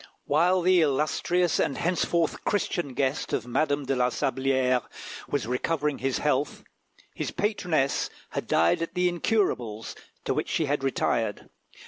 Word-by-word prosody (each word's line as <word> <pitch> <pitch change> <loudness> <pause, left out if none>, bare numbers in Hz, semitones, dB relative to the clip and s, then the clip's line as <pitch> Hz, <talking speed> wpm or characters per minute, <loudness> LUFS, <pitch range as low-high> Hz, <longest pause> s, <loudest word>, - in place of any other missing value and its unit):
While 175 +5 +3
the 180 0 +5
illustrious 155 +4 +1
and 135 - 0
henceforth 170 -1 0
Christian 175 -9 -1
guest 135 +3 -1
of 115 - 0
Madame 145 +3 0
de 135 +1 0
la 125 -1 +2
Sablière 130 -1 +1 0.5
was 145 - -1
recovering 145 +4 -1
his 135 -1 0
health, - - 0 0.5
his - - -3
patroness 180 -10 0 0.2
had - - -4
died 85 - +3
at 165 +2 -4
the 180 0 +3
Incurables, 145 - -1 0.3
to - - +1
which - - -2
she 160 - +1
had 145 -1 -1
retired. 115 -5 -1
145 Hz, 140 wpm, -27 LUFS, 130-175 Hz, 0.5 s, the